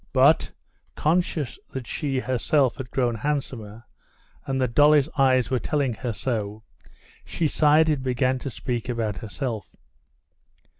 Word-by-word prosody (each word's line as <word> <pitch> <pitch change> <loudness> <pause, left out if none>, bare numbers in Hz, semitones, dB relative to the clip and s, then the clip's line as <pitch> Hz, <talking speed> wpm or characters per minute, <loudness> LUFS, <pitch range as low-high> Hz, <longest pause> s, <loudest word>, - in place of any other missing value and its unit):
But, - - +4 0.4
conscious 155 -4 0
that 130 -2 -5
she 140 +2 -2
herself 130 +1 +1
had 130 -2 -6
grown 120 -1 0
handsomer, 115 -4 -3 0.6
and 135 0 -1
that 125 -3 0
Dolly's 150 +1 +5
eyes 130 -3 +3
were 130 - +2
telling 140 -4 0
her 110 +3 -4
so, 110 -2 -3 0.6
she 165 - -1
sighed 155 +2 +4
and 150 -4 +1
began 130 0 0
to 135 - -5
speak 120 -1 -4
about 110 -5 -2
herself. 110 - -5
130 Hz, 135 wpm, -25 LUFS, 115-145 Hz, 0.6 s, Dolly's